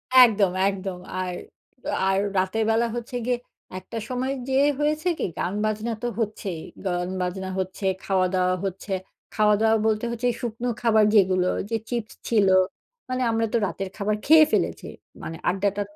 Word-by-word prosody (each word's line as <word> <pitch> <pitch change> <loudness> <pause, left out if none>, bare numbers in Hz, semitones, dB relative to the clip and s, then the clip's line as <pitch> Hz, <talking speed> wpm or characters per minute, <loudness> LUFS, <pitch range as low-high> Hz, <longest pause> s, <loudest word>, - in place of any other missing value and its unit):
একদম, 215 -7 +7 0.2
একদম 190 -2 -5 0.2
আর, 180 -1 -3 0.7
আর 190 0 +2 0.2
রাতের 190 +4 +1
বেলা 230 +1 +3
হচ্ছে 240 +1 -5
গিয়ে 250 -1 +1 0.4
একটা 230 - -8
সময় 255 +2 -1
যেয়ে 270 +2 +3
হয়েছে 305 +3 0
কি - - 0
গান-বাজনা 215 +4 -1
তো - - +1
হচ্ছেই 200 -6 -3 0.2
গান-বাজনা 185 +1 -2
হচ্ছে, 190 +1 -4 0.2
খাওয়া-দাওয়া 185 -1 +1
হচ্ছে 195 +1 -5 0.4
খাওয়া-দাওয়া 215 +1 +4
বলতে 215 +1 +1
হচ্ছে 240 +1 -1
শুকনো 235 +1 -3
খাবার 220 -2 +4
যেগুলো 185 -2 +4 0.2
যে 225 - 0
চিপস 235 -3 -3 0.2
ছিল, 210 -4 +4 0.6
মানে 255 0 -1
আমরা 225 0 +1
তো - - +4
রাতের 195 -1 -4
খাবার 210 0 0
খেয়ে 315 +1 +8
ফেলেছি। - - 0 0.4
মানে 165 0 -5
আড্ডাটা 200 +2 0
210 Hz, 145 wpm, -25 LUFS, 190-235 Hz, 0.7 s, খেয়ে